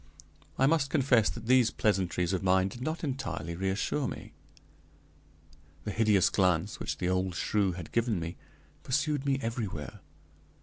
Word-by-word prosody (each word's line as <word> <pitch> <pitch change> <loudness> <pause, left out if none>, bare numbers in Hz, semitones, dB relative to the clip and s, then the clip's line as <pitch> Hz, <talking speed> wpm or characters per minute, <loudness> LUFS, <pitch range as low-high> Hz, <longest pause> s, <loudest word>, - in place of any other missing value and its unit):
I 135 - +4
must 145 -1 +2
confess 130 -6 +3
that 115 -1 -7
these 125 -1 +5
pleasantries 95 -4 0
of 95 - 0
mine 95 0 +3
did 120 - -10
not 155 +6 -3
entirely 130 - -3
reassure 95 - -1
me. - - -8 1.5
The 105 - -3
hideous 105 -4 +3
glance 90 0 +1
which - - -3
the 90 - -2
old 95 -1 0
shrew 100 -1 +1
had 85 -2 -8
given 115 -4 +1
me 85 +1 -5 0.5
pursued 140 +1 -1
me 135 -1 +2
everywhere. 110 - -4
105 Hz, 145 wpm, -30 LUFS, 95-130 Hz, 1.5 s, these